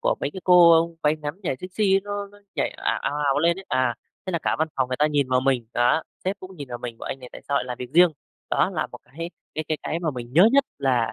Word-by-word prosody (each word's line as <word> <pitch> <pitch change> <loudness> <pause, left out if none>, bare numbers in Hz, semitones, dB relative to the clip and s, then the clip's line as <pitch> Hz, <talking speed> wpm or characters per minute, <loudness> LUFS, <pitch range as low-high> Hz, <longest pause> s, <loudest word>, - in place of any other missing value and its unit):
của - - +2
mấy 140 - -1
cái 190 - -7
cô 170 -2 +7
váy 150 +1 +3
ngắn 150 0 -5
thì 195 - -27
nhảy 135 -7 -1
sexy 195 +1 +1
nó 205 0 -4
nó 205 +1 -18 0.2
nhảy - - 0
ào, - - -2
ào, 145 - -1
ào 140 0 +2
lên 170 +4 +2
ấy. 195 - -9
À, 130 -2 +1 0.3
thế - - -2
là 170 - +1
cả - - +1
văn 160 +1 +1
phòng 130 -1 +1
người 130 - -2
ta 150 +2 +3
nhìn 145 -3 +1
vào 130 0 +3
mình, 130 -3 +1
đó, 120 +6 +3 0.2
sếp 190 +2 -1
cũng 185 0 -10
nhìn 145 -3 -7
vào 120 -1 -5
mình 120 -2 -7
bảo: - - -8
"Anh - - -4
này 125 - -10
tại - - -10
sao 140 - 0
lại - - +1
làm 125 -1 -5
việc 125 -1 -6
riêng?" 175 0 +7 0.4
Đó - - +2
là - - -2
một - - -11
cái 165 +7 -7 0.2
cái 155 - -2
cái 155 - -1
cái 165 - -2
mà 165 -3 0
mình 120 -3 -7
nhớ 180 - +7
nhất 280 0 +5
là, 120 -5 +1
150 Hz, 295 wpm, -24 LUFS, 130-180 Hz, 0.4 s, cô